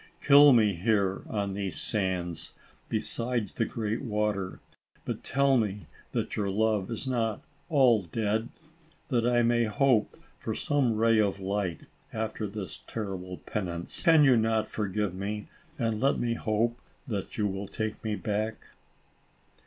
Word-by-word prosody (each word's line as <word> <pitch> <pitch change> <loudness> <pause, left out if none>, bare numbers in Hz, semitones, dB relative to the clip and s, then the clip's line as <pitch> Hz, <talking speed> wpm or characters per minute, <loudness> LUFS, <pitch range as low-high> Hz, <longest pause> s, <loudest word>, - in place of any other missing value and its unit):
Kill 145 0 +8
me 110 -5 +5
here, 100 +1 +1
on 100 -2 -2
these 100 -1 -3
sands, 90 -5 -2 0.4
beside 115 -3 -1
the 115 - -1
great 110 0 -2
water, 105 -5 -1 0.5
but - - -4
tell 140 -1 +3
me 105 -3 -1 0.3
that - - -2
your 100 -2 -1
love 105 -1 +1
is 115 +3 -4
not 115 -5 -1 0.3
all 130 -8 +5
dead, 110 +5 -1 0.6
that 120 -4 +2
I 120 -1 +3
may 120 0 +3
hope 125 -1 +2 0.2
for - - -3
some 135 -6 +1
ray 115 0 +4
of 100 -2 +1
light, 95 -2 -2 0.3
after 110 -1 -3
this 95 -6 -6
terrible 95 -4 -5
penance. 85 -4 -4
Can 165 -4 +6
you 135 -3 +6
not 110 -1 +1
forgive 105 -2 -2
me, 100 +3 -4 0.3
and 115 -4 0
let 135 - +3
me 120 -1 0
hope 115 +2 0 0.2
that 100 -6 -4
you 105 - +1
will 95 0 -4
take 110 0 -4
me 110 -1 -1
back 110 +1 -3
110 Hz, 145 wpm, -29 LUFS, 100-115 Hz, 0.6 s, Kill